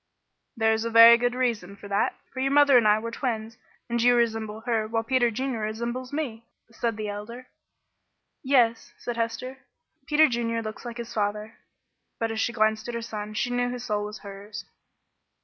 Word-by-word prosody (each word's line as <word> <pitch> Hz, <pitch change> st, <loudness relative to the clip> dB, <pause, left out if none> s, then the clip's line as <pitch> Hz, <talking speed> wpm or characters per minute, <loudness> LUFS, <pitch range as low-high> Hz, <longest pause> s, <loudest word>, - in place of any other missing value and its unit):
"There 220 Hz, -1 st, +3 dB
is 220 Hz, 0 st, -1 dB
a 230 Hz, -, -2 dB
very 230 Hz, +1 st, +9 dB
good 245 Hz, +1 st, 0 dB
reason 230 Hz, -7 st, -1 dB
for 200 Hz, -, -11 dB
that, 200 Hz, 0 st, 0 dB, 0.2 s
for 260 Hz, -, -6 dB
your 270 Hz, +1 st, +1 dB
mother 285 Hz, -1 st, +5 dB
and 235 Hz, -3 st, +6 dB
I 210 Hz, 0 st, +5 dB
were 230 Hz, +1 st, -5 dB
twins, 225 Hz, -3 st, -3 dB, 0.3 s
and 235 Hz, -1 st, -1 dB
you 245 Hz, +1 st, +5 dB
resemble 220 Hz, -2 st, -1 dB
her, 225 Hz, -2 st, -1 dB
while 225 Hz, 0 st, -1 dB
Peter 245 Hz, 0 st, +2 dB
Junior 255 Hz, +1 st, -3 dB
resembles 235 Hz, +4 st, -4 dB
me," 240 Hz, -7 st, -4 dB, 0.2 s
said 230 Hz, -1 st, -2 dB
the 215 Hz, -1 st, -4 dB
Elder. 210 Hz, +5 st, -7 dB, 1.0 s
"Yes," 245 Hz, -4 st, +2 dB
said 240 Hz, -, -5 dB
Hester, 235 Hz, +3 st, -3 dB, 0.5 s
"Peter 310 Hz, 0 st, +5 dB
Junior 230 Hz, -2 st, -2 dB
looks 215 Hz, +3 st, -7 dB
like 240 Hz, 0 st, -6 dB
his 235 Hz, -1 st, -7 dB
father;" 210 Hz, +1 st, -3 dB, 0.6 s
but 225 Hz, 0 st, -1 dB
as 220 Hz, -, -3 dB
she 235 Hz, -, +1 dB
glanced 220 Hz, -1 st, +1 dB
at 240 Hz, -, -4 dB
her 235 Hz, -, -3 dB
son 215 Hz, -2 st, -6 dB
she 245 Hz, +3 st, -1 dB
knew 245 Hz, 0 st, 0 dB
his 245 Hz, 0 st, -5 dB
soul 210 Hz, -4 st, -1 dB
was 210 Hz, +1 st, -7 dB
hers. 200 Hz, +1 st, -9 dB
230 Hz, 190 wpm, -26 LUFS, 220-245 Hz, 1.0 s, very